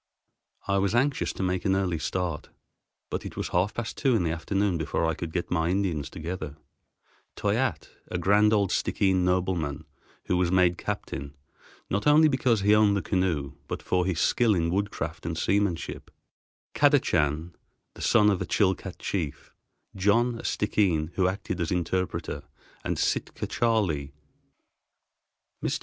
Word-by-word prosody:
I 100 0 +2
was 100 +3 +1
anxious 135 +3 +1
to - - -4
make 90 -1 -1
an 95 - +2
early 90 -4 0
start, 90 -3 -3 0.6
but - - -2
it - - -8
was - - -3
half 95 +5 +1
past 120 -2 -4
two 130 -3 +3
in 100 - +2
the 80 - 0
afternoon 95 +2 0
before 80 +1 -1
I 80 - +1
could 80 +1 -5
get 85 +1 -3
my 80 -1 +1
Indians 90 -7 -1
together—Toyatte, 80 -3 -5 0.2
a 90 - -3
grand 105 +4 +4
old 100 -3 +2
Stickeen 95 -2 +1
nobleman, 90 -5 0 0.4
who 90 - +1
was 90 -1 +1
made 90 -2 +3
captain, 70 -9 -5 0.5
not 100 +8 -1
only 155 +2 +7
because 130 -6 +2
he 105 +2 +4
owned 105 -1 +4
the 95 - -2
canoe, 85 -7 0
but - - -5
for 90 0 +1
his 90 -4 -1
skill 115 -4 +3
in 85 -1 0
woodcraft 100 +2 -2
and - - -3
seamanship; 100 -4 -1 0.6
Kadachan, 85 - +2 0.4
the - - -12
son 105 0 +4
of 95 - -1
a - - -1
Chilcat 95 -2 0
chief; 80 -7 -4 0.4
John, 115 +5 +2
a - - -8
Stickeen, 90 -7 +1
who 95 -2 +2
acted 95 -1 -3
as 80 - -1
interpreter; 90 +1 -2 0.4
and - - -2
Sitka - - -1
Charley. 95 -13 0 1.5
Mr. - - 0
95 Hz, 155 wpm, -27 LUFS, 85-105 Hz, 1.5 s, only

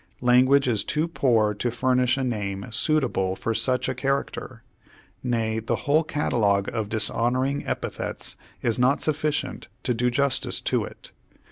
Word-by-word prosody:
Lan 125 +1 +5
guage 140 0 +4
is 110 -5 +1
too 155 +2 0
poor 115 -10 +2
to 110 +4 -2
furnish 125 +2 +2
a 135 - -1
name 100 -5 -3
suitable 110 -9 +1
for 115 - -2
such 130 +3 +1
a 130 - -1
character. 135 +2 -3 0.6
Nay, 115 -3 -1
the 115 - -1
whole 150 +3 +4
catalogue 105 -10 +1
of 110 -3 -2
dishonoring 120 +5 +1
epi - - -2
thets - - -4 0.3
is 115 0 +1
not 130 +4 +3
sufficient 150 -1 -1 0.2
to 125 - +1
do 125 +2 +1
justice 140 +2 +1
to - - 0
it. - - -11
125 Hz, 155 wpm, -25 LUFS, 110-140 Hz, 0.6 s, Lan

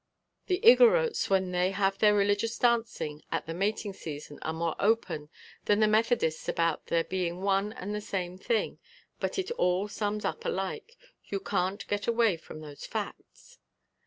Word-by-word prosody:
The 365 -1 +1
Igorrotes 480 0 +6
when 190 -2 +2
they 180 +1 +2
have 195 0 0
their 210 -1 +5
religious 205 +3 +1
dancing 230 -11 0
at - - -1
the 165 - -5
mating 200 +3 -1
season 145 -4 -8
are 160 - -2
more 165 0 -2
open 180 -9 0 0.4
than 205 0 +3
the 215 - +5
Methodists 215 -7 +1
about 165 -1 0
their 165 0 +2
being 180 0 -3
one 195 +1 +1
and 205 +1 -5
the 210 - -3
same 185 -3 -3
thing, 220 +4 -1 0.4
but - - -2
it 385 +3 -2
all 180 +3 +2
sums 210 0 -3
up - - -3
alike. 195 - -4 0.3
You 200 - -3
can't 190 +1 -1
get 205 0 -2
away 230 -4 +3
from 155 -1 -11
those 145 -2 -10
facts." - - -7
200 Hz, 165 wpm, -29 LUFS, 180-220 Hz, 0.4 s, Igorrotes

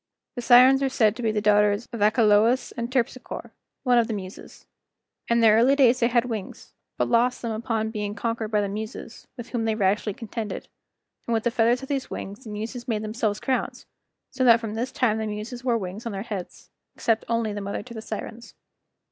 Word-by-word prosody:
—The 245 - -5
Sirens 255 +3 +7
are 270 - +1
said 220 -4 +2
to 245 - -7
be 225 -2 +1
the 215 -1 -1
daughters 210 +1 +3
of 230 - -5
Achelous 215 +2 +3
and 235 +1 -4
Terpsichore, 255 -1 -3 0.3
one 250 -2 +4
of 230 - +1
the 225 - -2
Muses. 190 -1 -9 0.6
In 235 0 +2
their 220 -2 +6
early 245 +5 +5
days 255 -3 +4
they 235 - +3
had 240 0 +2
wings, 220 -6 -6 0.2
but - - +1
lost 245 +2 +2
them 230 - -2
upon 220 0 -2
being 210 -2 -4
conquered 230 -1 -2
by 210 -1 +1
the 200 - -1
Muses, 215 +3 -7
with 240 - -8
whom 235 -3 -2
they 220 -1 +1
rashly 205 0 0
contended; 225 -1 -6 0.6
and 235 - +1
with 225 - 0
the 240 - +1
feathers 240 +2 +2
of - - -6
these 275 -2 -2
wings 205 +6 -7
the - - -8
Muses 225 +4 -6
made 220 -3 -1
themselves 215 -1 -2
crowns, 260 -2 -2 0.5
so 260 -1 -1
that 235 -2 +7
from 225 -2 -5
this 235 +4 -3
time 220 -4 +1
the 220 - -2
Muses 215 +4 -6
wore 240 -3 +2
wings 205 +3 -6
on 230 - -4
their 195 0 -4
heads, 200 -6 -7 0.2
except 225 -1 0
only 230 -2 0
the 205 - -4
mother 200 +1 -4
to 240 - -11
the 220 - -6
Sirens. 225 +2 -7
225 Hz, 215 wpm, -25 LUFS, 210-240 Hz, 0.6 s, Sirens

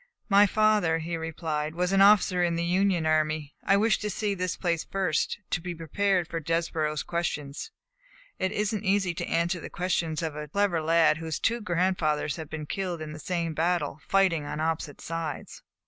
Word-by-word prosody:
"My 200 0 +6
father," 210 -6 +3
he 165 +1 -3
replied, 160 -1 -3
"was 180 +1 0
an 195 0 +4
officer 195 -3 +5
in 170 -1 +1
the 170 0 -1
Union 180 -1 +2
army. 155 -1 0
I 195 - +4
wished 215 0 +2
to 210 - -2
see 205 +1 -1
this 185 -2 -2
place 170 -3 0
first, 190 -5 -1
to 175 - 0
be 175 0 -5
prepared 180 +2 0
for 165 - -3
Desborough's 160 -1 -1
questions. 150 - -3 0.7
It 190 - 0
is 210 +1 -1
n't 215 - -3
easy 195 -3 +1
to - - -4
answer 170 +2 +1
the - - -8
questions 170 -3 -1
of 160 -2 -3
a 150 0 -5
clever 185 0 +1
lad 160 0 +4
whose 160 -1 -3
two 235 +1 0
grandfathers 175 -6 0
have 160 -2 -7
been 155 -1 -5
killed 180 +1 -3
in 155 -1 -6
the 155 - -8
same 170 -1 -2
battle, 170 -2 0
fighting 190 -5 +3
on 145 +1 -5
opposite 160 -2 -2
sides." 165 -3 -5
170 Hz, 190 wpm, -27 LUFS, 160-190 Hz, 0.7 s, My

